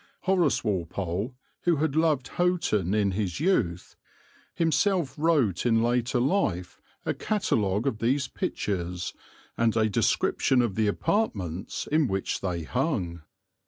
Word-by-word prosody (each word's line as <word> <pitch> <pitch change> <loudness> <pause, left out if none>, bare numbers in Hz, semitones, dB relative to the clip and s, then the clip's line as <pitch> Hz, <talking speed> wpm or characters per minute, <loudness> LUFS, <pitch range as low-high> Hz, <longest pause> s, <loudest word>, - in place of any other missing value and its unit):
Horace 180 -6 +2
Walpole, 100 +3 -2 0.3
who 175 -1 +4
had 150 -1 0
loved 155 -5 +2
Houghton 135 - +1
in 100 -2 +2
his 95 -1 -2
youth, 115 - 0 0.6
himself 165 0 +1
wrote 145 - +2
in 115 -1 +3
after 120 +1 +1
life 120 - 0 0.2
a - - 0
catalogue 105 - 0
of 115 -6 -1
these 130 +4 +1
pictures 90 -6 -3 0.5
and 115 -1 +2
a 110 -1 +3
description 125 +5 +2
of 115 -5 -1
the 110 +1 +1
apartments 100 - -1
in 155 -1 +2
which 95 -3 -2
they 90 -3 -2
hung. 95 - -2
115 Hz, 125 wpm, -27 LUFS, 95-155 Hz, 0.6 s, who